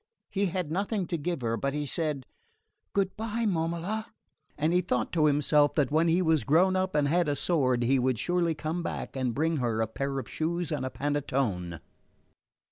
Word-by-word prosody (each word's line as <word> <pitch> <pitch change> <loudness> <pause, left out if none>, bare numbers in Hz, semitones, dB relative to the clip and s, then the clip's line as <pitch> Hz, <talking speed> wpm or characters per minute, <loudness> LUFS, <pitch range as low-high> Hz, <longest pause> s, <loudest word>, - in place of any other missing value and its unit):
He 200 0 +1
had 180 -3 -3
nothing 200 +2 -1
to 170 - -2
give 170 -1 -2
her, 115 -1 0
but 140 +5 -2
he 150 0 -1
said: 150 -2 -2 0.7
"Good 195 -1 0
bye, 225 +1 -2
Momola"; 175 +4 -1 0.5
and 155 +3 +1
he 180 - +4
thought 125 -10 -1
to 155 -3 +3
himself 145 0 +3
that 145 -3 +2
when 160 +2 +3
he 170 +3 +3
was 160 -3 +2
grown 180 +6 +4
up 185 -1 0
and 145 -1 +3
had 170 +1 +2
a 145 - +1
sword 130 -7 +1
he 130 +3 +3
would 125 -1 +1
surely 175 +3 +1
come 160 +3 -3
back 170 - -5
and 130 -3 -1
bring 160 +2 +1
her 120 -4 0
a 110 - +2
pair 135 +5 -3
of 130 - -4
shoes 170 +1 -2
and 135 -4 -1
a - - -3
panettone. 130 - -2
155 Hz, 200 wpm, -28 LUFS, 135-175 Hz, 0.7 s, he